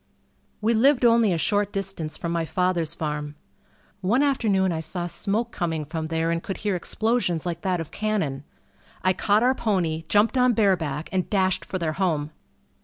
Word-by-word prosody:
We 225 Hz, +2 st, +2 dB
lived 250 Hz, +3 st, +4 dB
only 230 Hz, -3 st, +5 dB
a 170 Hz, -, +1 dB
short 205 Hz, +4 st, +1 dB
distance 195 Hz, -6 st, -4 dB
from 170 Hz, -, -3 dB
my 170 Hz, -1 st, 0 dB
father's 170 Hz, -1 st, 0 dB
farm. 150 Hz, -2 st, -4 dB, 0.7 s
One 230 Hz, +9 st, +2 dB
afternoon 210 Hz, -9 st, +2 dB
I 160 Hz, -, -2 dB
saw 175 Hz, +2 st, -3 dB
smoke 215 Hz, +6 st, -1 dB
coming 160 Hz, -4 st, -2 dB
from 160 Hz, +1 st, -4 dB
there 165 Hz, +1 st, 0 dB
and 170 Hz, 0 st, -1 dB
could 195 Hz, -, -5 dB
hear 205 Hz, -2 st, +1 dB
explosions 185 Hz, -2 st, 0 dB
like 170 Hz, -1 st, -3 dB
that 185 Hz, -2 st, 0 dB
of 165 Hz, -1 st, -6 dB
cannon. 195 Hz, -11 st, -2 dB, 0.6 s
I 185 Hz, -, +3 dB
caught 205 Hz, +4 st, +2 dB
our 255 Hz, +1 st, +4 dB
pony, 175 Hz, -10 st, -1 dB
jumped 215 Hz, +5 st, +3 dB
on 250 Hz, -1 st, +4 dB
bareback, 170 Hz, -9 st, +1 dB
and 185 Hz, -2 st, -1 dB
dashed 190 Hz, -2 st, +1 dB
for 185 Hz, -, -4 dB
their 165 Hz, -3 st, -1 dB
home. 160 Hz, -4 st, -1 dB
185 Hz, 180 wpm, -24 LUFS, 165-215 Hz, 0.7 s, only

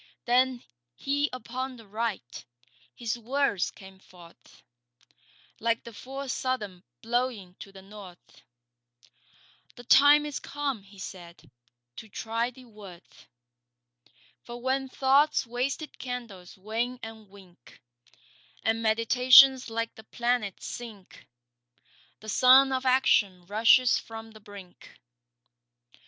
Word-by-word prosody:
Then 250 Hz, 0 st, +2 dB, 0.3 s
He 285 Hz, -, -1 dB
upon 255 Hz, +1 st, -6 dB
the 225 Hz, -2 st, -14 dB
Right. 215 Hz, -, -5 dB, 0.5 s
His 235 Hz, 0 st, -4 dB
words 245 Hz, -4 st, 0 dB
came 190 Hz, -1 st, -15 dB
forth 175 Hz, -3 st, -19 dB, 1.0 s
Like 230 Hz, 0 st, 0 dB
the 235 Hz, -, -11 dB
full 270 Hz, +5 st, -8 dB
Southern 235 Hz, -8 st, -3 dB, 0.2 s
blowing 230 Hz, -5 st, -2 dB
to 195 Hz, -, -11 dB
the 190 Hz, -1 st, -14 dB
north. 195 Hz, -3 st, -14 dB, 1.3 s
'The 245 Hz, -, -12 dB
time 285 Hz, +4 st, +6 dB
is 295 Hz, -2 st, -4 dB
come,' 280 Hz, -6 st, -4 dB
he 200 Hz, +1 st, -18 dB
said, 170 Hz, -6 st, -11 dB, 0.4 s
'to 220 Hz, -, -11 dB
try 230 Hz, +4 st, -2 dB
thy 255 Hz, +1 st, -16 dB
worth. 195 Hz, -, -15 dB, 1.2 s
For 240 Hz, 0 st, -9 dB
when 265 Hz, +2 st, -1 dB
Thought's 275 Hz, +3 st, +2 dB
wasted 255 Hz, +6 st, -4 dB
candles 230 Hz, -9 st, -8 dB
wane 225 Hz, +6 st, -3 dB
and 220 Hz, -2 st, -10 dB
wink, 185 Hz, -9 st, -18 dB, 0.8 s
And 225 Hz, 0 st, 0 dB
meditations 250 Hz, +4 st, +6 dB
like 230 Hz, 0 st, -3 dB
the 220 Hz, -, -14 dB
planets 235 Hz, -4 st, -2 dB
sink, 220 Hz, -6 st, -10 dB, 0.9 s
The 215 Hz, -, -9 dB
sun 260 Hz, +4 st, +6 dB
of 260 Hz, 0 st, -1 dB
Action 205 Hz, -8 st, +2 dB
rushes 230 Hz, +5 st, +4 dB
from 225 Hz, 0 st, -10 dB
the 215 Hz, -, -15 dB
brink. 200 Hz, -3 st, -14 dB
230 Hz, 115 wpm, -27 LUFS, 200-255 Hz, 1.3 s, time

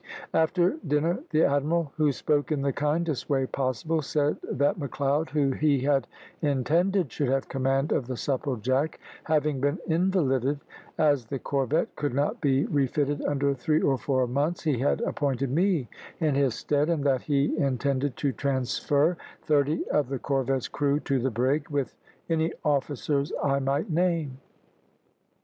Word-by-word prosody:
After 175 Hz, -, +2 dB
dinner, 155 Hz, +4 st, +1 dB
the 155 Hz, 0 st, +3 dB
admiral, 150 Hz, +2 st, +1 dB
who 155 Hz, -2 st, +3 dB
spoke 145 Hz, +2 st, 0 dB
in 145 Hz, -3 st, 0 dB
the 140 Hz, -1 st, 0 dB
kindest 150 Hz, 0 st, -1 dB
way 135 Hz, -2 st, +2 dB
possible, 135 Hz, +5 st, -1 dB
said 145 Hz, 0 st, 0 dB
that 145 Hz, +5 st, +1 dB
Macleod, 140 Hz, +2 st, -1 dB
who 145 Hz, -1 st, +1 dB
he 140 Hz, -1 st, +2 dB
had 140 Hz, 0 st, +1 dB, 0.3 s
intended 165 Hz, -, +1 dB
should 145 Hz, -, -1 dB
have 135 Hz, +1 st, 0 dB
command 135 Hz, +2 st, 0 dB
of 120 Hz, -, 0 dB
the 130 Hz, -, -3 dB
Supplejack 130 Hz, +2 st, -1 dB, 0.3 s
having 150 Hz, -3 st, +1 dB
been 145 Hz, +4 st, +1 dB
invalided, 150 Hz, -6 st, +1 dB, 0.4 s
as 145 Hz, -5 st, +3 dB
the 135 Hz, +5 st, -4 dB
corvette 140 Hz, +3 st, -1 dB
could 145 Hz, -4 st, -2 dB
not 140 Hz, +1 st, 0 dB
be 135 Hz, -1 st, +2 dB
refitted 145 Hz, 0 st, 0 dB
under 140 Hz, -1 st, +1 dB
three 155 Hz, +4 st, +1 dB
or 135 Hz, -, +2 dB
four 130 Hz, -2 st, +1 dB
months, 145 Hz, +7 st, -1 dB
he 150 Hz, -7 st, +1 dB
had 140 Hz, -, +1 dB
appointed 135 Hz, -2 st, -1 dB
me 170 Hz, -4 st, +1 dB, 0.3 s
in 155 Hz, -4 st, +1 dB
his 135 Hz, -4 st, +2 dB
stead, 150 Hz, +2 st, 0 dB
and 160 Hz, -4 st, 0 dB
that 135 Hz, -3 st, +2 dB
he 145 Hz, 0 st, +1 dB
intended 140 Hz, -1 st, 0 dB
to 140 Hz, -, 0 dB
transfer 140 Hz, +5 st, 0 dB, 0.3 s
thirty 150 Hz, +1 st, +1 dB
of 145 Hz, -4 st, +1 dB
the 135 Hz, -, -2 dB
corvette's 135 Hz, -1 st, -1 dB
crew 145 Hz, 0 st, 0 dB
to 135 Hz, -2 st, 0 dB
the 130 Hz, +2 st, 0 dB
brig, 130 Hz, +6 st, 0 dB
with 145 Hz, -3 st, -2 dB, 0.3 s
any 165 Hz, 0 st, +1 dB
officers 145 Hz, 0 st, 0 dB
I 140 Hz, -1 st, +2 dB
might 140 Hz, +7 st, -1 dB
name. 165 Hz, -5 st, 0 dB
145 Hz, 155 wpm, -27 LUFS, 135-155 Hz, 0.4 s, the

